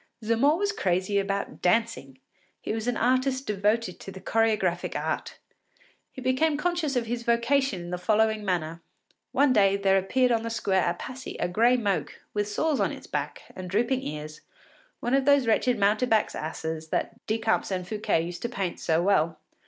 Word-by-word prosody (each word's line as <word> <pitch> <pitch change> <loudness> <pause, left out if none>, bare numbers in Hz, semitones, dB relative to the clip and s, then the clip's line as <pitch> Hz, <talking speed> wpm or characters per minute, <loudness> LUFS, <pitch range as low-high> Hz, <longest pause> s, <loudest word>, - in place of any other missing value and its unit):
Zamore 235 +8 +3
was 405 +2 0
crazy 190 - 0
about 200 0 -3
dancing. 180 - 0 0.4
He - - -4
was 225 +1 -3
an 245 - 0
artist 260 +2 +1
devoted 210 0 0
to 195 - -8
the 190 - -9
choregraphic 195 -4 0
art. - - -3 0.7
He 260 - -9
became 285 +4 +2
conscious 330 -3 -1
of 245 -2 +1
his 235 +1 -3
vocation 235 -2 +1
in 175 - -7
the 180 - -3
following 220 +2 +2
manner. 170 -3 -2 0.5
One 280 -2 +3
day 200 -3 +4
there 195 -1 +3
appeared 250 +6 +1
on 230 -1 +2
the 230 - -4
square 195 -4 +1
at 175 0 0
Passy 260 +1 -7
a - - +1
gray 230 +8 +3
moke, 205 -5 -2
with 205 -1 0
sores 295 +8 0
on - - +1
its - - -9
back, - - -4
and 185 -1 -7
drooping 240 +7 +1
ears, 150 - -6 0.6
one 240 - -1
of 270 -1 +3
those 285 -2 +5
wretched 235 +2 +2
mountebanks’ 215 +2 +2
asses 160 0 -4
that - - -3
Decamps 225 +1 0
and 185 -2 -3
Fouquet 210 -6 0
used 175 +1 -6
to 235 - -2
paint 195 -7 -3
so 165 +1 +1
well. 165 -4 +2
215 Hz, 180 wpm, -27 LUFS, 185-250 Hz, 0.7 s, those